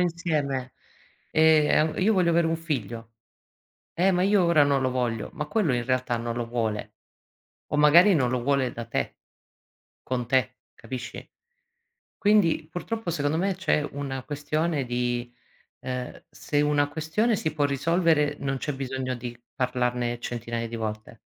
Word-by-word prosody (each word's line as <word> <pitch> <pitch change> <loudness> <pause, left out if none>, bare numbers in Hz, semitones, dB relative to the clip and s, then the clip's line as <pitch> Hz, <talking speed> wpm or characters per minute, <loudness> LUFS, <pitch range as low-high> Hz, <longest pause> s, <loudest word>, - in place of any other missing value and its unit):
insieme, 155 -7 -1 0.6
ehm, 155 0 +4
an - - -1
io 220 +3 +4
voglio 180 -4 +3
avere 170 0 +3
un 165 0 0
figlio." 115 -8 -4 0.8
"Eh, 185 +3 +3
ma 180 0 +2
io 200 -1 +4
ora 170 -3 +5
non 140 -1 +2
lo 130 - +1
voglio." 120 -4 -2
Ma 150 -1 -4
quello 165 - +1
in 120 -1 -1
realtà 130 -2 0
non 115 0 -3
lo 120 -1 -2
vuole. 115 -3 -3 0.7
O 150 - -1
magari 170 +7 +7
non 125 -6 +2
lo 125 -2 -1
vuole 135 -2 +1
da 115 0 -6
te - - -3 0.9
con 125 -2 -3
te, 130 -3 +1 0.2
capisci? 125 -2 -7 0.9
Quindi, 195 -7 +3
purtroppo 220 +3 -4
secondo 150 -1 0
me 190 +1 0
c'è 165 -5 +1
una 135 -2 -4
questione 150 0 -1
di 120 0 -2 0.5
ehm, 125 -1 -5
se 145 0 -1
una 145 -1 +2
questione 160 +10 0
si 155 -5 -2
può 145 - +1
risolvere 150 +1 +2
non 135 -1 -1
c'è 145 - -3
bisogno 130 -1 -3
di 120 0 -7 0.2
parlarne 125 -1 -1
centinaia 115 -1 -4
di 115 - -5
volte. 110 0 -5
140 Hz, 155 wpm, -26 LUFS, 125-160 Hz, 0.9 s, magari